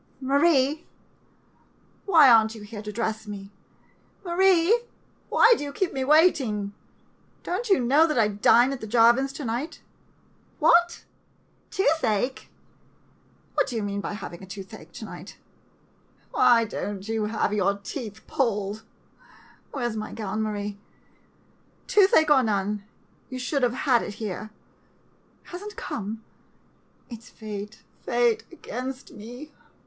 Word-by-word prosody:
] - - -36
Marie 280 +2 +2 0.6
— - - -36
why 325 -7 +7
are 230 -3 +8
n't 220 +1 -5
you 215 - -10
here 210 0 -8
to 210 0 -6
dress 220 0 -3
me, 200 -1 -8 0.7
Marie? 370 +4 +4 0.5
Why 460 +1 +6
do 290 - -5
you 285 - -5
keep 360 +5 -2
me 265 - -2
waiting? 265 - +3 0.7
Don't 415 +7 -3
you 390 - +5
know 280 +7 +4
that 305 - -1
I 220 -2 +4
dine 235 +5 +4
at 270 - -7
the 220 - -6
Jarvin's 240 +4 +4
to 285 - -6
night? 240 +7 -4 0.8
What? 345 +2 +3 0.7
Toothache 260 - 0 0.5
— - - -35
what - - +1
do 245 - -5
you 220 - -1
mean 200 0 -3
by - - -4
having 190 -4 -8
toothache 195 0 -10
to - - -8
night? - - -10 0.9
Why 230 -1 +4
don't 205 -2 -5
you 220 -1 -1
have 210 -1 -1
your 200 -1 +1
teeth 220 0 -8
pulled? 210 -5 -1 0.9
Where's 240 -5 -3
my 215 0 -5
gown, 215 -1 -3
Marie? 205 -1 -4 1.1
Toothache, 380 -7 +4
or 275 -3 +6
none, 205 -2 -1 0.4
you 255 - -6
should 255 +3 -1
have 245 -1 +2
had 250 -4 +4
it 205 - -6
here. 215 -1 -5 1.0
Has 355 +1 -8
n't 420 0 -8
come? 220 +1 -5 0.9
It 230 -3 -8
's 240 - -16
fate 210 -1 -8
— - - -36
fate 240 -2 +2
against 260 -5 -7
me 245 +7 -10
235 Hz, 145 wpm, -25 LUFS, 210-285 Hz, 1.1 s, are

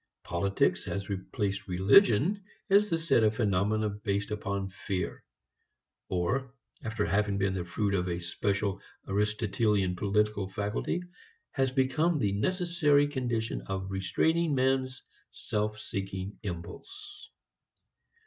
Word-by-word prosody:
Politics 95 +3 +1
has 100 0 -4
replaced 100 +1 -3
religion 120 - +4 0.3
as 205 +1 +5
the 165 - +2
set 160 -7 +3
of 110 0 +3
phenomena 105 0 +1
based 100 0 -2
upon 100 -2 -3
fear; 95 -2 -4 0.9
or 125 +9 -1 0.3
after 110 -1 -1
having 100 0 +1
been 95 -1 +1
the 95 -2 -2
fruit 100 +4 -1
of 90 -2 0
a 85 0 -2
special 100 +3 -1 0.3
Aristotelian 105 -1 +1
political 105 +1 +1
faculty, 105 - -2 0.5
has 135 -1 +1
become 140 +6 +2
the 105 -8 +1
necessary 155 - +2
condition 120 -5 -2
of 95 0 -3
restraining 150 - +1
man's 130 0 +1 0.3
self 105 0 -3
seeking 95 -1 -5
impulse. 385 - -8
105 Hz, 115 wpm, -30 LUFS, 95-130 Hz, 0.9 s, as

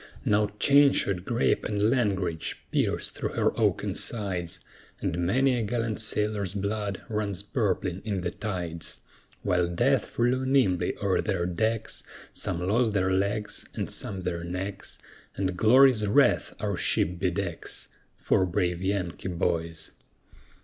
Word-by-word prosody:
Now 105 0 +3
chain 140 0 +6
shot, 95 -2 -1
grape, 120 0 +1
and 105 +1 +1
langrage 95 -10 0
pierce - - +1
through - - -4
her - - +1
oaken - - +1
sides, 95 -6 -2 0.4
And 85 +1 -1
many 130 +6 +3
a 120 - 0
gallant 115 0 -2
sailor's 105 -3 -1
blood 100 0 -2
runs 100 -3 -1
purpling 100 - -1
in 100 -4 -2
the 90 0 -2
tides; 90 -6 -4 0.4
While 90 -1 +2
death 85 0 +2
flew 125 +2 0
nimbly 110 -10 +2
o'er 100 -2 +2
their 95 -5 -1
decks, 110 +5 -1 0.3
Some 90 -1 -3
lost 110 +2 +2
their 95 -2 +1
legs, 100 +3 -1
and - - -2
some 95 -2 -4
their 85 -2 -2
necks, 95 +3 -5 0.4
And 95 -2 -1
Glory's 115 +1 +5
wreath 125 +5 +3
our - - -1
ship 90 +1 +1
be 95 -1 +2
decks, 90 -2 -3 0.3
For - - +2
brave 90 -1 0
Yankee 95 -2 -2
boys. 85 -2 -2
100 Hz, 140 wpm, -27 LUFS, 90-110 Hz, 0.4 s, chain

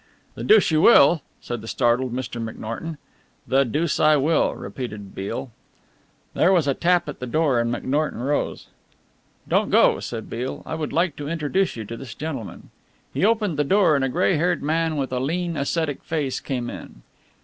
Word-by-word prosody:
"The - - -7
deuce 425 - +5
you 155 0 +3
will?" 165 -7 +6 0.2
said 120 -2 -5
the 110 - -10
startled 120 +2 +1
Mr. 120 -2 -4
McNorton. 115 +8 -6 0.5
"The 135 +1 +4
deuce 150 +6 -1
I 155 0 +5
will," 150 +3 +2
repeated 105 -6 -7
Beale. 115 +6 -5 0.8
There 175 - +3
was 170 -6 +3
a 140 - +3
tap 175 +3 +2
at 150 - -7
the 125 - -5
door 145 -2 +2
and 115 0 0
McNorton 145 +3 -1
rose. 145 +2 -1 0.8
"Don't - - +1
go," - - +4
said 115 -2 -6
Beale, 125 +3 -5
"I - - -5
would 160 -2 -3
like 170 -2 +1
to 145 0 -5
introduce 170 +4 0
you 110 -2 -6
to 115 +3 -7
this 125 -1 -9
gentleman." 145 -8 -6 0.4
He - - -1
opened 210 -6 +2
the 150 - +2
door 190 0 +4
and 140 - +1
a 135 - +1
grey 180 +4 +2
haired 175 0 0
man 160 +1 0
with 135 -2 -2
a 125 - 0
lean, 170 +5 -2
ascetic 145 0 -2
face 150 -5 -2
came 125 -3 -4
in. - - -11
145 Hz, 185 wpm, -23 LUFS, 125-165 Hz, 0.8 s, will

